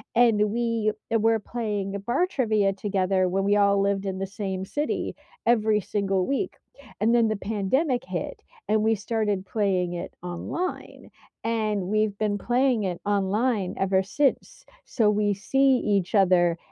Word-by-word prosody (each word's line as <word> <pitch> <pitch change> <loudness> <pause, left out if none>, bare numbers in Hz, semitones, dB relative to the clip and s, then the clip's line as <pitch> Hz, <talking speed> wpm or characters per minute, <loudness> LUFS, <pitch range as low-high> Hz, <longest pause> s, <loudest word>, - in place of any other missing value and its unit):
and 220 -3 +4
we 230 -2 0 0.2
were 225 0 +3
playing 210 -3 -3
the 200 - -4
bar 240 - +1
trivia 215 - +1
together 190 -2 0
when 195 +2 0
we 200 +1 +3
all 200 -1 +3
lived 200 0 0
in 190 -1 -3
the 195 - -2
same 190 -1 -4
city, 295 +9 -2 0.3
every 220 -2 +3
single 195 -1 -1
week. 280 +7 -1 0.4
And 225 +3 +2
then 230 -2 +4
the 215 - 0
pandemic 225 - 0
hit, - - -4 0.3
and 215 0 +2
we 220 +1 +2
started 210 -2 -2
playing 185 -4 0
it 175 +1 -6
online, 180 - -5 0.3
and 220 -2 0
we've 210 +2 0
been 210 -1 0
playing 245 0 +1
it 180 -3 -3
online 205 +1 0
ever 190 0 +2
since. 290 - -1 0.2
So, 220 -4 +2
we 205 0 +1
see 270 +7 +3
each 200 -1 +1
other 180 -3 +4
210 Hz, 155 wpm, -25 LUFS, 195-230 Hz, 0.4 s, and